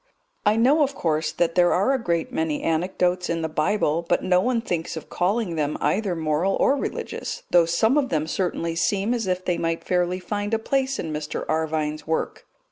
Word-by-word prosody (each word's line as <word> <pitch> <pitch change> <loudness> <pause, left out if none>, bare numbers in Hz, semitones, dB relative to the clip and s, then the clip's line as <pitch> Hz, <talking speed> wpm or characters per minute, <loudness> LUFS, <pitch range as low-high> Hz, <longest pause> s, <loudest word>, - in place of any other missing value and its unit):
I 210 - +5
know, 265 +7 +4
of 280 -1 +1
course, 155 -1 0
that 170 -1 0
there 175 0 +4
are 200 +9 +2
a 265 - 0
great 170 -5 -1
many 160 -2 -1
anecdotes 180 +2 0
in 165 -1 -1
the - - 0
Bible, 160 +1 0
but 175 - +2
no 180 -1 +3
one 245 +2 +1
thinks 170 -7 -3
of 155 - -9
calling 185 -1 0
them 150 -1 -1
either 200 -3 0
moral 160 +4 0
or 275 - +3
religious, 280 - -4
though 170 -2 +5
some 220 - +3
of 265 -3 -1
them 155 -1 0
certainly 170 -1 -2
seem 200 +6 +1
as 230 -5 -2
if 185 0 -1
they 175 -2 0
might 165 0 -1
fairly 180 0 0
find 205 +4 -2
a - - +2
place 265 +4 -1
in 160 -2 -4
Mr. 150 0 -4
Arvine's 155 -1 -1
work. 160 - -2
175 Hz, 205 wpm, -24 LUFS, 160-210 Hz, -, I